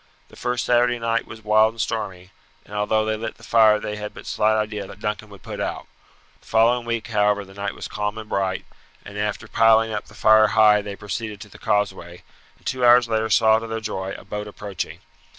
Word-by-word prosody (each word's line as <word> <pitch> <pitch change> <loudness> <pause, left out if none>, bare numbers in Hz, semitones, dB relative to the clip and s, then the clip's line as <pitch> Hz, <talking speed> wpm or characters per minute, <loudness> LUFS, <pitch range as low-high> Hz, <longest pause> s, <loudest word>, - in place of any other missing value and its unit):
The - - -16
first 125 0 -2
Saturday 120 0 +3
night 115 0 -1
was 110 0 -11
wild 110 +1 +4
and - - -15
stormy, 95 -5 -3 0.3
and - - -14
although 105 +1 +1
they 110 0 0
lit 110 +1 -5
the - - -18
fire 110 -2 +5
they 105 0 -5
had 105 0 -7
but - - -11
slight 110 +1 +2
idea 105 -2 -3
that - - -12
Duncan 105 0 -4
would 100 -2 -14
put - - -7
out. - - -3 0.5
The - - -25
following 115 +2 +3
week, 115 0 -2
however, 105 -2 +1
the 95 - -15
night 100 0 -4
was - - -6
calm 105 +1 -3
and 110 -1 -7
bright, 95 -2 -1 0.4
and 100 - -10
after 105 +1 -3
piling 115 0 +4
up 105 - -3
the - - -17
fire 110 0 +6
high 105 -1 +5
they 100 -1 -6
proceeded 105 +1 -5
to 105 - -10
the - - -15
causeway, 105 -5 -2 0.3
and - - -28
two 130 -1 -2
hours 120 0 +6
later 110 -1 0
saw 110 +1 +5
to 115 - -7
their 115 0 -3
joy 95 -3 -4
a - - -14
boat 105 +1 -5
approaching. 105 -1 -6
110 Hz, 220 wpm, -23 LUFS, 105-115 Hz, 0.5 s, fire